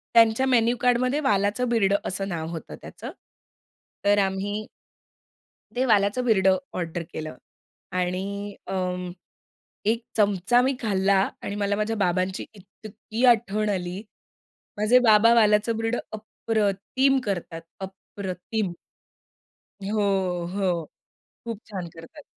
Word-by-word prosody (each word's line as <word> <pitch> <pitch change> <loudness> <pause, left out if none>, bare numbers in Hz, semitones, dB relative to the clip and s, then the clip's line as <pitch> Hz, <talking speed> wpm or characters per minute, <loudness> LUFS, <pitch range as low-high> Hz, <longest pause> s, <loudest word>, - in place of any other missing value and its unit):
त्यांच्या 230 +3 +5
मेनू 240 -1 +3
कार्डमध्ये 250 +3 +2
वालाचं 210 -2 +1
बिरडं 200 -4 +3
असं 195 +1 -2
नाव 165 -3 -3
होतं 165 -2 -7
त्याचं. - - -8 0.9
तर 205 0 +5
आम्ही 205 +2 -3 1.1
ते 255 - +1
वालाचं 210 +1 +3
बिरडं 190 -4 +4 0.2
ऑर्डर 170 -1 -3
केलं 155 -3 -5 0.6
आणि 180 +1 -1 0.4
अं, 180 -1 -2 0.7
1 225 +2 +1
चमचा 205 +3 +3
मी 265 +1 +1
खाल्ला 200 -3 +2 0.2
आणि 200 - -4
मला 200 0 +1
माझ्या 215 +2 -1
बाबांची 185 -1 0
इतकी 215 +4 -5
आठवण 215 -1 -2
आली. 185 -1 -3 0.8
माझे 215 +4 +5
बाबा 230 -1 +6
वालाचं 220 0 +3
बिरडं 225 +2 -1
अप्रतिम 220 +4 0
करतात, 175 -4 -4 0.2
अप्रतिम. 190 +1 -5 1.1
हो, 210 +2 -1 0.5
हो. 180 -5 0 0.6
खूप 230 -3 -5
छान 185 -4 -5
करतात. 165 - -12
205 Hz, 110 wpm, -25 LUFS, 190-225 Hz, 1.1 s, बाबा